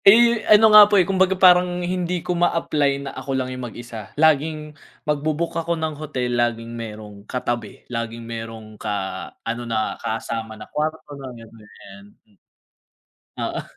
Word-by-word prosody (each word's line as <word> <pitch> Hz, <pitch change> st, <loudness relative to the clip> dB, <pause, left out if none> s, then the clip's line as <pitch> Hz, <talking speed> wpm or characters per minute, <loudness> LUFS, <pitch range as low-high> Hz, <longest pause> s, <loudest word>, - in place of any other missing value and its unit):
Eh, 235 Hz, +2 st, +7 dB
ano 215 Hz, 0 st, +7 dB
nga 210 Hz, -1 st, +10 dB
po, 205 Hz, -, +4 dB
eh, 185 Hz, -, +5 dB
kumbaga 190 Hz, 0 st, +2 dB
parang 180 Hz, -1 st, +5 dB
hindi 180 Hz, -1 st, -2 dB
ko 180 Hz, -, 0 dB
ma-apply 150 Hz, -5 st, +1 dB
na -, -, -5 dB
ako 135 Hz, -1 st, -3 dB
lang 130 Hz, 0 st, -2 dB
yung 125 Hz, -1 st, -5 dB
mag-isa. 115 Hz, -3 st, -9 dB
Laging 155 Hz, 0 st, +2 dB, 0.3 s
magbu-book 155 Hz, +2 st, -1 dB
ako 170 Hz, +1 st, -2 dB
ng 160 Hz, -1 st, -2 dB
hotel 125 Hz, -5 st, -2 dB
laging 115 Hz, -1 st, -2 dB
merong 105 Hz, -3 st, -8 dB
katabi, 120 Hz, -4 st, -4 dB
laging 115 Hz, -1 st, -5 dB
merong 115 Hz, -2 st, -8 dB
ka 95 Hz, -3 st, -3 dB, 0.2 s
ano 115 Hz, +1 st, -3 dB
na 110 Hz, -1 st, -1 dB
kasama 110 Hz, 0 st, -4 dB
na 105 Hz, -, -9 dB
kwarto 155 Hz, +1 st, -3 dB
na 135 Hz, -2 st, -8 dB
gan'to, 115 Hz, -1 st, -14 dB
ganyan. 105 Hz, -2 st, -15 dB, 1.2 s
Oo. -, -, -3 dB
130 Hz, 155 wpm, -22 LUFS, 115-170 Hz, 1.2 s, nga